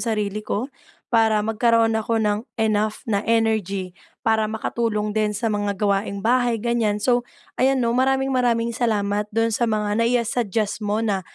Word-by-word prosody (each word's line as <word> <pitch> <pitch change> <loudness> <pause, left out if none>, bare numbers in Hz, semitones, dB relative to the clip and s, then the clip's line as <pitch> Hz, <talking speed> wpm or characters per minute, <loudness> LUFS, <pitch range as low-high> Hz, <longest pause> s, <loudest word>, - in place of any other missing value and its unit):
sarili 210 -2 -1
ko, 215 +1 -2 0.5
para 220 -2 +4
magkaroon 225 +1 +2
ako 220 +1 0
ng 210 -1 +1 0.2
enough 215 -1 0
na 205 -3 0
energy, 215 -5 0 0.3
para 220 -1 +2
makatulong 215 -1 -2
din 210 -1 0
sa 225 0 -1
mga 205 -1 -1
gawaing 200 0 -1
bahay 245 0 +2
ganyan. 225 -2 0
So, 245 +3 +2 0.4
ayan 260 -1 +3
'no, 230 - +1
maraming-maraming 255 -2 +1
salamat 210 -3 0
do'n 225 +2 0
sa 235 +2 +1
mga 210 0 0
nai 235 +2 +3
ah, 235 - 0
suggest 220 -2 -1
mo 210 +1 -1
na 200 -3 0
220 Hz, 160 wpm, -22 LUFS, 210-230 Hz, 0.5 s, para